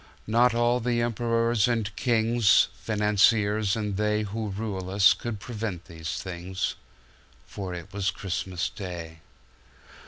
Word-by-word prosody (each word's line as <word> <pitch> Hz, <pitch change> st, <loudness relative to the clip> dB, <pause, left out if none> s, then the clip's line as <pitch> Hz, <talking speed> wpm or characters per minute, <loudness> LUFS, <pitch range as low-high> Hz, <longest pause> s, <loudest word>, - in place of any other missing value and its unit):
Not 115 Hz, +2 st, +3 dB
all 120 Hz, +1 st, +2 dB
the 120 Hz, 0 st, 0 dB
emperors 115 Hz, -1 st, +1 dB
and 115 Hz, -3 st, -1 dB
kings, 115 Hz, -3 st, +3 dB
Financiers 105 Hz, -1 st, +2 dB
and 105 Hz, -3 st, -2 dB
theyWho 105 Hz, -1 st, -1 dB
rule 100 Hz, -4 st, -4 dB
us 100 Hz, +1 st, +6 dB
could 120 Hz, -4 st, -5 dB
prevent 105 Hz, -5 st, -5 dB
these 80 Hz, -2 st, -6 dB
things 95 Hz, +1 st, -3 dB, 0.7 s
—For 95 Hz, +1 st, -6 dB
it 90 Hz, +3 st, -9 dB
was 100 Hz, -1 st, 0 dB
Christmas 90 Hz, -1 st, -3 dB
Day. 85 Hz, -5 st, -7 dB
105 Hz, 120 wpm, -27 LUFS, 95-115 Hz, 0.7 s, us